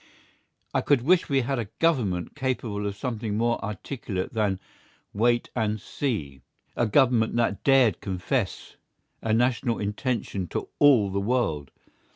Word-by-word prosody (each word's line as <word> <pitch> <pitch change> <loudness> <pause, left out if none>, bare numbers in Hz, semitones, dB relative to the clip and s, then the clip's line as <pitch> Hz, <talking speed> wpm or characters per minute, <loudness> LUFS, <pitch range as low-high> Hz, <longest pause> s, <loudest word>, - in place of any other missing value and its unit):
I - - +2
could 140 -5 +2
wish 175 +5 +3
we 135 -1 +3
had 135 +1 -1
a 115 - -2
Government 115 - +1
capable 120 -7 -2
of 100 - -4
something 110 -3 -3
more 120 +1 0
articulate 100 -1 -4
than 105 -4 0 0.5
"Wait 120 +3 +1
and 110 -2 0
see!" 80 - -3 0.3
a 120 - +1
Government 115 -1 +3
that 115 -4 0
dared 130 -8 +4
confess 95 -3 -3 0.4
a 115 - -1
national 120 +1 +2
intention 105 -3 -2
to - - -4
all 125 -9 +5
the 100 +1 -1
world. 100 - 0
115 Hz, 140 wpm, -26 LUFS, 100-130 Hz, 0.5 s, all